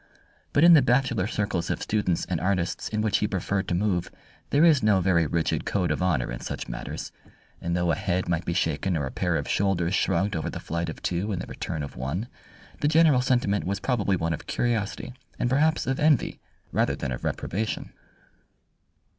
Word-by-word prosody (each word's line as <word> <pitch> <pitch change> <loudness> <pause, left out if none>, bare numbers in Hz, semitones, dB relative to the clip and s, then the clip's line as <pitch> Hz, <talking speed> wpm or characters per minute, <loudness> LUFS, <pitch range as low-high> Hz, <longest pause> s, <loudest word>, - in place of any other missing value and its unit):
But 145 - +3
in 170 0 +9
the 155 - +8
bachelor 125 -6 +2
circles 100 -6 -2
of - - -1
students 105 -5 0
and 90 -4 -2
artists 90 -1 -1
in 110 0 -1
which 110 -2 +2
he 105 - +1
preferred 95 -1 -2
to 90 - 0
move 90 -2 0 0.4
there 145 +4 +4
is 155 -5 +5
no 105 -3 +4
very 85 -3 +2
rigid 80 +2 0
code 90 -3 0
of - - -1
honour 85 -11 +1
in - - -5
such - - -5
matters, - - -6 0.5
and 85 +1 -1
though 85 -1 +1
a - - +2
head 90 +2 -1
might 85 -1 0
be 85 - -2
shaken 85 +1 0
or 70 - -1
a 65 - -5
pair - - 0
of - - -2
shoulders 95 -3 +1
shrugged 95 +1 +1
over 80 - -2
the - - -6
flight 85 0 -3
of - - -8
two 90 +5 -1
and 95 - -2
the - - -4
return 80 -2 -4
of 70 - -8
one, 75 - -3 0.5
the 145 - +1
general 155 -4 +5
sentiment 120 -6 +1
was 100 +1 -2
probably 105 -4 +1
one 85 -1 -1
of 75 - -7
curiosity 120 +1 -1 0.2
and 120 - 0
perhaps 155 +4 +2
of 130 +1 -1
envy 150 -4 +2 0.3
rather - - +1
than 70 - -4
of 60 - -5
reprobation. 110 +5 -3
95 Hz, 205 wpm, -26 LUFS, 85-115 Hz, 0.5 s, in